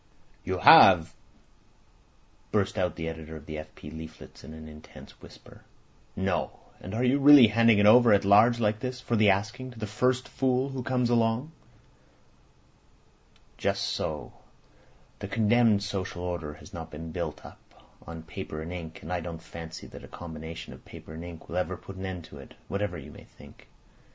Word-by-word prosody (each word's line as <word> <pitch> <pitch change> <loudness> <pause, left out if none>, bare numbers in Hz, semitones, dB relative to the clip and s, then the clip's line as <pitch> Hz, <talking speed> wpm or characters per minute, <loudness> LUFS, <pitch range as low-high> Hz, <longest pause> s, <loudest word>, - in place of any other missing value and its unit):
"You - - -2
have!" 90 -4 +8 1.4
burst 100 -2 0
out 90 -3 -1
the 80 -1 -5
editor 80 -1 -7
of 75 -2 -10
the 75 -1 -6
F. 75 0 -11
P. 75 - -10
leaflets 80 0 -11
in - - -10
an 80 0 -10
intense 75 0 -14
whisper. - - -15 0.5
"No! 95 -1 -1 0.3
And 95 +4 -7
are 120 - 0
you 130 +3 +3
really 140 -2 +9
handing 115 0 +4
it 105 - +4
over 120 +2 +7
at 100 -1 +4
large 110 +4 +5
like 105 -1 0
this, 125 +1 -5
for 120 - -2
the 105 -2 +4
asking, 110 +7 -1
to 120 - -13
the 110 - -4
first 125 +5 0
fool 130 0 0
that 130 -3 -6
comes 125 -2 +1
along?" 115 +5 +1 2.1
"Just - - 0
so! 75 -1 -3 0.9
The 100 - -5
condemned 110 0 +3
social 95 -3 -4
order 85 -4 -4
has 100 - -15
not 80 -2 -7
been 80 +1 -8
built - - -5
up - - -12 0.5
on 80 0 -8
paper 75 -1 -7
and 80 +3 -6
ink, 80 -2 -8
and 85 - -5
I 90 - -1
don't 85 -1 -6
fancy 80 0 -10
that - - -12
a - - -10
combination 80 0 -8
of - - -15
paper 80 - -12
and 80 +1 -8
ink 85 -2 -10
will 85 - -5
ever 90 0 -2
put 95 - -11
an 95 0 -5
end 90 -2 -6
to 70 - -13
it, 70 - -13
whatever 100 +1 -3
you - - -10
may - - -14
think. - - -17
95 Hz, 185 wpm, -27 LUFS, 80-115 Hz, 2.1 s, really